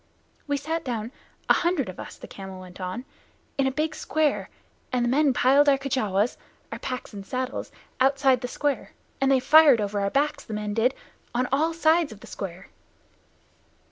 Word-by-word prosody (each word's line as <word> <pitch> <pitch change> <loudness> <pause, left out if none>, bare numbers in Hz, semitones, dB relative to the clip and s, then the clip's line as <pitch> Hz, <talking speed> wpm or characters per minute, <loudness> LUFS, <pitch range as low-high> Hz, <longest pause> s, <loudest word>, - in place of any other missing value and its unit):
"We 285 0 +1
sat 325 +3 -3
down 230 -3 -3 0.4
a - - +7
hundred 340 -7 +1
of 185 - -8
us," - - -8
the - - -10
camel 190 -1 -9
went 185 0 -11
on, 185 +8 -4 0.5
"in 270 - +3
a - - +1
big 310 +3 -1
square, 310 -1 0 0.4
and 250 -1 +1
the - - +1
men 285 +2 +4
piled 275 +3 +5
our 275 - +5
packs 250 0 -3
and 200 -1 -7
saddles, 255 +5 -4 0.3
outside 270 -1 +3
the 250 - -3
square, 290 +2 -2 0.3
and 270 0 +3
they 265 - +5
fired 285 -1 +7
over 205 0 -1
our 200 - +1
backs, 290 +6 0
the 220 - -6
men 210 0 -3
did, 235 +4 +2 0.4
on 250 +1 +1
all 310 +5 +2
sides 325 -2 +3
of 215 - -11
the - - -11
square." 190 -1 -7
260 Hz, 175 wpm, -26 LUFS, 215-285 Hz, 0.5 s, a